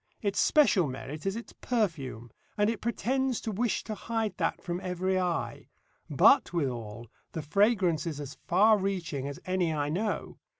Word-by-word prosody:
Its 200 -1 0
special 230 - +4
merit 140 +5 -6
is 195 - 0
its 235 - -8
perfume, 140 - -2 0.3
and 210 +1 +3
it 230 - -6
pretends 255 +2 0
to 220 - -4
wish 225 +3 0
to 220 - -5
hide 225 0 -2
that - - 0
from 175 -2 -4
every 185 +1 0
eye. 165 -10 -2 0.4
But, - - +5
withal, 120 -9 -3 0.3
the 160 - -4
fragrance 185 -1 +2
is 150 -3 -4
as 145 -1 -6
far 210 +4 +5
reaching 175 -8 -2
as 140 - -6
any 185 -2 +1
I 145 -2 -1
know. 205 +7 -2
185 Hz, 165 wpm, -29 LUFS, 150-215 Hz, 0.4 s, But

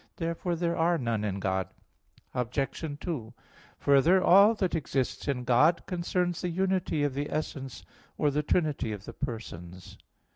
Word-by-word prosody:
Therefore 170 +1 -2
there 170 0 -1
are 170 +1 +2
none 115 -6 -1
in 100 -2 -2
God. 95 -2 -1 0.7
Obj. 135 +4 -2
2: 125 -11 -4 0.4
Further, 160 +7 +4
all 200 +5 +7
that 190 -4 -1
exists 140 -6 -2
in 130 -3 -1
God 130 +8 +3
concerns 175 -1 -1
the 180 - -1
unity 185 -3 0
of 145 -2 0
the 145 +2 -3
essence 135 -4 -4 0.3
or 150 - +2
the 150 +2 +1
trinity 150 -7 0
of 100 0 -8
the - - -8
persons. 90 -9 -7
145 Hz, 150 wpm, -29 LUFS, 120-170 Hz, 0.7 s, all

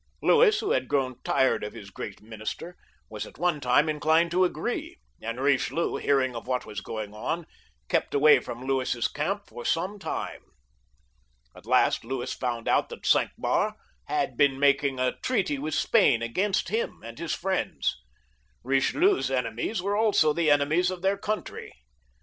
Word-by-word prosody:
L^uis, 445 -3 +5
who 420 - -1
had - - +1
grown 130 -3 -1
tired 130 - +2
of 105 - -5
his 100 -1 -10
great 100 +1 -8
minister, 110 +10 -6 0.3
was 105 -2 -6
at - - -15
one 175 -2 +1
time 125 +4 +3
inclined 160 +2 +2
to 185 +2 +3
agree, 180 - -2 0.2
and 115 +1 -4
Bichelieu, 140 +5 +1
hearing 130 -3 +2
of 115 - -7
what 125 -1 -1
was 105 - -6
going 110 -2 -6
on, 165 +10 -3 0.4
kept - - 0
away 150 +2 +6
from 120 +2 -8
Louis's 130 -3 0
camp 195 +8 -2
for 120 - -10
some 185 +9 -1
time. - - -4 1.1
At - - -15
last - - +3
Louis 130 +1 -3
found 120 -2 -3
out - - +2
that - - -10
Cinq - - +4
Mars - - +1 0.3
had - - 0
also - - -22
been 135 -2 +3
making 140 -1 +2
a 130 0 0
treaty 195 - 0
with 155 +2 -3
Spain 155 - +3
against 190 - 0
him 225 +3 -2
and 115 0 -9
his 170 - -2
friends. 190 - -2 0.6
Eichelieu's 320 - +2
enemies 125 - -2
were 200 +1 0
also 205 -8 +3
the 165 0 +1
enemies 150 +5 +3
of 185 -1 -6
their 195 +1 +3
coimtry. 210 +2 -4
145 Hz, 165 wpm, -27 LUFS, 125-180 Hz, 1.1 s, away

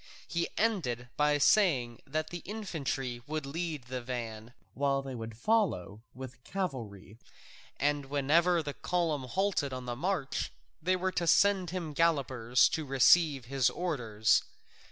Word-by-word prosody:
He 170 0 -1
ended 140 - 0
by 150 0 +3
saying 135 - +3
that 155 +3 -2
the 175 - -4
infantry 150 - -4
would 155 -1 -3
lead 155 -1 -4
the 125 +1 -5
van, 120 -2 -6 0.2
while 140 0 0
they 135 -1 -6
would 115 -2 -7
follow 125 - 0
with 130 -1 -7
the 130 - -23
cavalry, 120 - -5 0.6
and 145 0 +1
whenever 160 +5 +3
the 145 -1 -4
column 160 -6 -1
halted 180 -3 0
on 130 -1 -5
the 120 -1 -3
march 155 -1 -2 0.3
they 185 +4 +2
were 185 +1 -1
to 175 -2 -1
send 195 0 +4
him 170 -4 -4
gallopers 130 -7 +3
to 160 - -2
receive 140 0 +4
his 130 -1 +2
orders. 115 -12 +1
140 Hz, 145 wpm, -31 LUFS, 125-170 Hz, 0.6 s, send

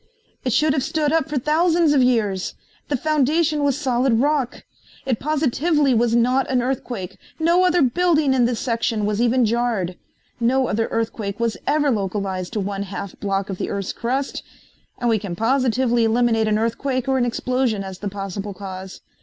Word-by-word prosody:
It 255 - 0
should 300 +5 +3
have 275 - 0
stood 305 +1 0
up 320 -3 +1
for 295 - -1
thousands 320 +3 +3
of 275 - +4
years. 215 -7 +1 0.3
The 285 - 0
foundation 305 +2 +1
was 280 -2 +1
solid 260 -3 +1
rock. 275 +1 0 0.4
It 255 -4 0
positively 295 0 +1
was 235 0 +2
not 250 +3 +2
an 255 -2 +1
earthquake. 245 -7 -4 0.2
No 340 +3 +3
other 355 -3 +3
building 305 +1 +2
in 250 -2 +3
the 240 0 0
section 230 -2 -1
was 210 +1 0
even 245 +1 +3
jarred. 225 -6 -1 0.4
No 255 +3 +2
other 225 +1 0
earthquake 220 -2 -3
was 230 -3 0
ever 295 -1 +2
localized 195 -3 -2
to 215 - -1
one 200 0 -3
half 200 -1 -6
block 195 -1 -2
of 185 - -6
the - - -2
earth's 200 -2 -3
crust, 265 +4 -2 0.6
and 240 - -2
we 225 -2 +2
can 195 -4 -5
positively 240 +1 +2
eliminate 225 -1 +2
an 215 0 +2
earthquake 245 +3 -1
or 265 -1 +2
an 245 - +2
explosion 245 -3 -1
as 190 -1 -8
the 205 - -3
possible 195 0 -5
cause. 190 0 -8
240 Hz, 180 wpm, -21 LUFS, 210-275 Hz, 0.6 s, of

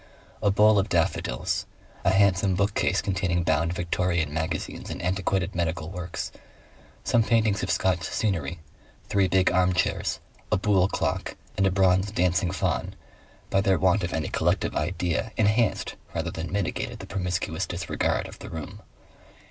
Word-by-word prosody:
A 105 - +3
bowl 105 +1 +5
of 100 +2 -1
daffodils, 80 -8 0 0.4
a - - +3
handsome 95 -1 +3
bookcase 100 +2 +1
containing 90 -3 0
bound 85 +1 +1
Victorian 85 -3 0
magazines 80 +1 -3
and - - -5
antiquated 95 +1 0
medical 80 -1 -2
works, 90 -2 -5 0.7
some 120 - +3
paintings 110 -3 +2
of - - -3
Scotch 90 -2 +1
scenery, 85 -3 -1 0.5
three 100 -2 +3
big 95 0 +3
armchairs, 90 0 +1 0.3
a 105 - +4
buhl 95 -2 +3
clock, - - -2 0.2
and 95 0 +3
a - - +2
bronze 95 +1 +3
Dancing 90 -2 +1
Faun, 90 -8 -1 0.6
by 95 - +3
their 95 -2 +3
want 95 +2 +3
of 85 - -2
any 80 -1 -2
collective - - 0
idea 90 +6 -1
enhanced 110 +1 +2 0.2
rather - - -1
than 80 +1 -5
mitigated 100 -3 -2
the - - -8
promiscuous 90 -3 -2
disregard - - -1
of - - -12
the - - -8
room. 80 -2 -7
95 Hz, 150 wpm, -26 LUFS, 85-100 Hz, 0.7 s, bowl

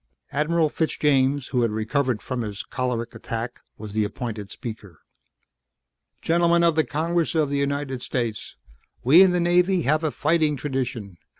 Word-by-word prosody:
Admiral 155 +3 +2
Fitzjames, 145 -3 +1
who 125 -3 +1
had 115 - +2
recovered 110 +2 -1
from 125 -1 -3
his 105 -3 -5
choleric 125 -2 -3
attack, 115 +1 -5 0.2
was 105 -1 -8
the 110 0 +1
appointed 105 -1 -5
speaker. 110 -8 -9 1.2
"Gentlemen 170 +1 +3
of 170 -1 +4
the 155 0 +2
Congress 165 +3 -1
of 150 -3 +1
the 140 - 0
United 140 -2 -2
States. 120 -5 -3 0.5
We 145 +9 +7
in 190 - +7
the 180 0 +1
Navy 175 +1 +3
have 155 +4 +2
a 155 - +1
fighting 155 0 +1
tradition. 125 -9 -4
140 Hz, 155 wpm, -24 LUFS, 115-160 Hz, 1.2 s, We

